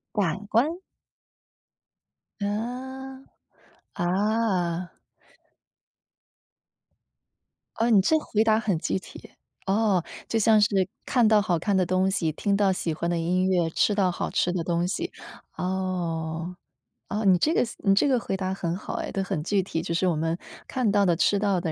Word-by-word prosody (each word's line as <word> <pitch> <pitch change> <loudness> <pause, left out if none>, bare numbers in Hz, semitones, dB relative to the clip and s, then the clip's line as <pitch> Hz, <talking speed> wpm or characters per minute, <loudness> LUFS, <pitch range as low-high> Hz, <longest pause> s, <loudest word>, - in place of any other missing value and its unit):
感 195 -1 0
官？ 300 +10 +2 1.6
嗯， 260 +6 -4 0.7
啊。 185 -2 0 2.9
哦， 230 +2 +1
你 210 -4 +6
这 315 +11 +3
回 215 -7 0
答 220 -1 +3
很 205 -6 0
具 - - -1
体。 - - -13 0.3
哦， 195 -3 +2 0.2
就 225 - 0
像 220 0 +5
是 205 - +5 0.4
看 245 -4 +3
到 215 -1 +5
好 175 -4 0
看 195 +3 +1
的 185 - +3
东 185 +2 +1
西， 175 -5 0
听 200 +6 0
到 200 -2 +3
喜 170 -3 -2
欢 170 - -3
的 175 - 0
音 180 +3 +1
乐， 175 -3 +2
吃 205 - +2
到 195 -3 +2
好 - - -3
吃 175 - +1
的 180 -2 -2
东 170 +1 0
西。 340 - -3 0.5
哦， 175 -2 -3 0.5
哦， 210 +2 -2
你 185 -2 +6
这 305 - +2
个 - - +3
思 235 - -6
你 195 - +3
这 200 - +3
个 260 -3 +3
回 195 - -3
答 190 -1 -2
很 170 -3 -2
好 190 - -6
哎， - - -4
都 195 - -2
很 155 -5 -3
具 195 +3 +1
体。 165 -3 -3
就 170 - -3
是 175 +3 +1
我 175 - +2
们 165 +2 -1 0.3
看 250 -6 0
到 200 0 +3
的、 175 -2 +3
吃 200 - +2
到 195 -3 +1
的， 165 -2 -2
190 Hz, 180 characters per minute, -26 LUFS, 175-215 Hz, 2.9 s, 你